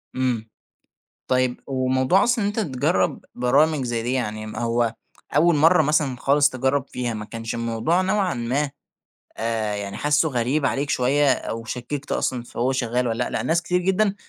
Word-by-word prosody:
إمم، 125 -4 -1 0.8
طيب 130 -1 +1
وموضوع 130 +7 +2
أصلًا 240 -3 +1
إن 200 - +2
أنت 210 +2 -2
تجرّب 130 - 0
برامج 140 +3 +2
زي 120 -1 -2
دي، 120 +2 -2
يعني 110 -4 -2
ما 110 - -7
هو 115 -1 0 0.4
أول 170 +2 +5
مرّة 160 +2 +5
مثلًا 150 -3 +1
خالص 140 +3 +3
تجرّب 130 +1 0
فيها، 120 -2 -3
ما 110 0 -5
كانش 115 +1 -6
الموضوع 115 +9 0
نوعًا 190 -1 +1
ما 130 +5 -1 0.7
آآ، 110 -2 -1
يعني 100 -1 -5
حاسُّه 150 +2 +2
غريب 130 +3 0
عليك 140 +2 -1
شوية 140 +3 +3
أو 115 0 -4
شكِّكت 130 +5 -5
أصلًا 125 -2 -1
في - - -12
هو 125 +3 +2
شغّال 125 -1 0
والَّا 115 +2 -1
لأ، - - -5
لأن - - -2
ناس 170 +1 +2
كتير 180 +1 0
جدًا، 190 +2 +1
130 Hz, 175 wpm, -23 LUFS, 120-150 Hz, 0.8 s, أول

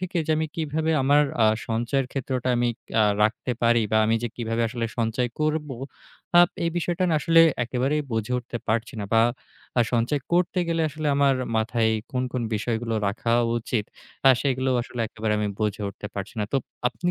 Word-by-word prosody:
থেকে 185 -1 -4
যে - - -1
আমি 160 0 0
কিভাবে 160 0 -1
আমার 145 +2 +5 0.2
আ - - +6 0.2
সঞ্চয়ের 120 +4 0
ক্ষেত্রটা 130 -2 -2
আমি 120 0 +2 0.3
আ - - +6 0.2
রাখতে 110 +3 0
পারি 115 0 +4
বা - - +4
আমি 115 - +2
যে 120 - -1
কিভাবে 115 0 -1
আসলে 115 -1 -3
সঞ্চয় 115 +2 0
করব। 155 0 0 0.7
আপ 175 - +6 0.2
এই 165 - +1
বিষয়টা 175 +1 0
না 160 - +2
আসলে 165 +1 +5 0.2
একেবারেই 135 +5 0
বুঝে 110 +2 -1
উঠতে 120 -1 -6
পারছি 115 +4 0
না। - - -3
বা 115 - +6 0.6
আ - - +6
সঞ্চয় 120 +5 +1
করতে 180 +1 +2
গেলে 165 -1 +1
আসলে 155 +1 -5
আমার 140 -1 +4 0.2
মাথায় 110 0 +1 0.2
কোন, 125 - 0
কোন 125 -2 -1
বিষয়গুলো 115 +1 -2
রাখা 115 +3 -1 0.3
উচিত 110 -2 -2 0.4
আ - - +10
সেগুলো 130 -1 0
আসলে 120 0 -7
একেবারে 110 0 -2
আমি 105 -1 0
বুঝে 105 -1 -1
উঠতে 105 +1 -8
পারছি 100 +2 -5
না। - - +1
তো - - +3 0.3
আপনি 175 +7 -2
125 Hz, 185 wpm, -25 LUFS, 115-150 Hz, 0.7 s, আ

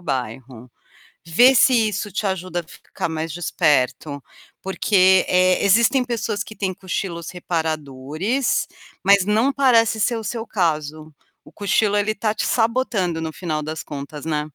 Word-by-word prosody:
bairro. 125 -4 -5 0.6
Vê 245 +11 +5
se 235 -3 +4
isso 205 0 -4
te 210 - -2
ajuda 185 -2 -2
a - - -9
ficar 170 0 -7
mais 160 -1 -4
desperto, 145 -3 0 0.4
porque, 190 -1 +3
eh, 185 +1 +3
existem 235 +6 +4
pessoas 225 -4 -3
que 215 - -11
têm 190 -3 -3
cochilos 180 -3 -5
reparadores, 160 - -2 0.4
mas 200 -1 +5
não 220 +6 +2
parece 230 -5 +3
ser 235 +3 +1
o 220 - -7
seu 230 0 -4
caso. 155 -4 -2 0.3
O - - -16
cochilo 205 0 +1
ele 205 +1 +1
está 215 0 -2
te - - -2
sabotando 225 -8 0
no 160 -1 -4
final 155 -4 -3
das 155 +1 -5
contas, 145 +1 -8
né? 150 -2 0
185 Hz, 150 wpm, -21 LUFS, 155-215 Hz, 0.6 s, Vê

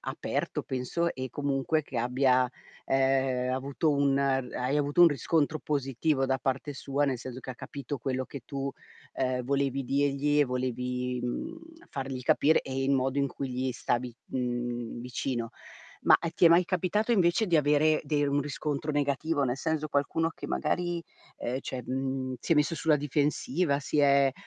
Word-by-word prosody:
aperto - - -3
penso, 135 +7 -1
e 130 -1 -5
comunque 145 +2 0
che 135 -3 -8
abbia, 125 +1 +2 0.3
ehm, 130 -1 +1
avuto 140 +4 0
un 140 -1 +2
hai 135 0 0
avuto 145 +4 +3
un 175 - +10
riscontro 155 +2 0
positivo 135 0 0
da 130 0 +1
parte 135 +3 -2
sua, 140 +2 -1
nel 130 -2 0
senso 130 +1 -7
che 130 - -7
ha - - -6
capito 140 +2 -6
quello 130 +1 -2
che 140 -4 -8
tu, 140 -1 -3 0.4
ehm, 130 -1 -1
volevi, 140 0 0
dirgli 140 +2 +2
e - - +5
volevi, 125 -1 -2
mhmm, 310 - -4 0.3
fargli 135 -2 -4
capire 150 +5 +4
e 135 0 -3
il 135 - +1
modo 135 0 +1
in 140 0 +2
cui 135 0 -5
gli 130 +1 -2
stavi, 120 0 -2
mhmm, 120 -2 -3
vicino. 120 -1 -3 0.5
Ma, - - +7
e 170 - -3
ti 170 +1 +4
è - - +9
mai 170 +2 +6
capitato 185 +6 0
invece 190 +1 +3
di 170 -4 +3
avere 150 +1 +3
de 145 -2 +1
un 140 0 +1
riscontro 145 +1 -3
negativo? 145 +1 0
Nel 130 0 0
senso, 160 -1 -1
qualcuno 160 +3 0
che - - -8
magari, 175 +2 -1 0.3
ehm, 125 +2 -3
cioè, 130 -1 -5
mhmm, 130 0 -2
si 165 - +1
è - - +5
messo 150 +2 +2
sulla 160 -2 +3
difensiva, 145 +1 0
si 145 +1 -2
è, 140 -1 +5
140 Hz, 170 wpm, -29 LUFS, 130-150 Hz, 0.5 s, un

